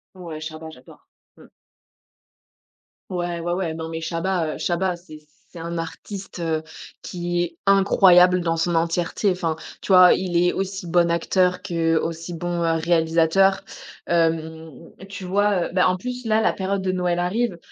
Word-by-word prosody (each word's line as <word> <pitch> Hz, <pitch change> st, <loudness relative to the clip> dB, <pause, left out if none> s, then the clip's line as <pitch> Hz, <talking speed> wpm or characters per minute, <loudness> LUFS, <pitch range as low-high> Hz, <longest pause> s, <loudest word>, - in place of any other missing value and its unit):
Ouais, 165 Hz, -4 st, -8 dB
Chabat 160 Hz, 0 st, -7 dB
j'adore. 125 Hz, -3 st, -17 dB, 0.3 s
Mmh. -, -, -16 dB, 1.6 s
Ouais, 175 Hz, -2 st, -3 dB
ouais, 175 Hz, +1 st, -2 dB
ouais, 175 Hz, -3 st, -2 dB
non, 160 Hz, 0 st, -6 dB
mais 165 Hz, 0 st, -5 dB
Chabat, 165 Hz, -1 st, -2 dB
heu, -, -, -8 dB
Chabat 180 Hz, 0 st, -1 dB
c'est 155 Hz, -3 st, -13 dB, 0.3 s
c'est 170 Hz, -, -11 dB
un 170 Hz, +1 st, -5 dB
artiste, 190 Hz, +4 st, -7 dB
heu, 160 Hz, -2 st, -1 dB, 0.4 s
qui 175 Hz, 0 st, -2 dB
est 170 Hz, -1 st, -4 dB
incroyable 185 Hz, -2 st, +5 dB
dans 165 Hz, -1 st, -1 dB
son 170 Hz, +1 st, 0 dB
entièreté, 170 Hz, +4 st, 0 dB
enfin 170 Hz, -3 st, -2 dB, 0.3 s
tu 195 Hz, -, 0 dB
vois, 180 Hz, -1 st, +8 dB
il 180 Hz, -2 st, -2 dB
est 175 Hz, +1 st, +3 dB
aussi 190 Hz, -2 st, -4 dB
bon 170 Hz, 0 st, +3 dB
acteur 180 Hz, +2 st, +1 dB
qu'aussi 165 Hz, 0 st, -1 dB
bon, 175 Hz, 0 st, -3 dB
heu, 165 Hz, -, +2 dB
réalisateur, 170 Hz, +3 st, +2 dB, 0.4 s
hem, 160 Hz, -3 st, -2 dB, 0.2 s
tu 195 Hz, -1 st, -8 dB
vois, 200 Hz, 0 st, +1 dB
heu, -, -, -11 dB
ben, 180 Hz, -, +3 dB
en 185 Hz, 0 st, +3 dB
plus, 250 Hz, +5 st, -6 dB
là, 220 Hz, 0 st, +2 dB
la -, -, +3 dB
période 195 Hz, 0 st, -2 dB
de 185 Hz, -1 st, -1 dB
Noël 180 Hz, -1 st, -1 dB
arrive 185 Hz, +2 st, -1 dB
175 Hz, 165 wpm, -22 LUFS, 165-185 Hz, 1.6 s, vois